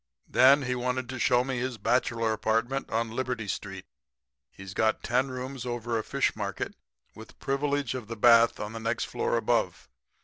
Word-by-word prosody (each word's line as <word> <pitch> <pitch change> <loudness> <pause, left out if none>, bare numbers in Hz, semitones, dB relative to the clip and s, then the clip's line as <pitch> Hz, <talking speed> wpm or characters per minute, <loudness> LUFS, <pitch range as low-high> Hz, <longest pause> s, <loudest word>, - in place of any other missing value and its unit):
"'Then 135 +2 +6
he 125 -1 -1
wanted 125 0 -2
to 130 0 -6
show 120 +1 +3
me 130 -1 -3
his 125 -1 -3
bachelor 115 -2 +1
apartment 115 +5 -1
on 115 0 -1
Liberty 125 -2 -3
street. 95 -1 -5 0.6
He's 95 +4 -10
got 110 +1 +1
ten 125 +3 +1
rooms 130 0 -6
over 120 -2 -2
a - - -4
fish 140 +4 0
market 100 -3 -4 0.4
with - - -13
privilege 140 0 -1
of 125 -5 -6
the 115 0 -6
bath 115 +1 +5
on 105 +1 -5
the 115 - -5
next 115 +1 -1
floor - - -1
above. - - 0
120 Hz, 175 wpm, -28 LUFS, 110-130 Hz, 0.6 s, Then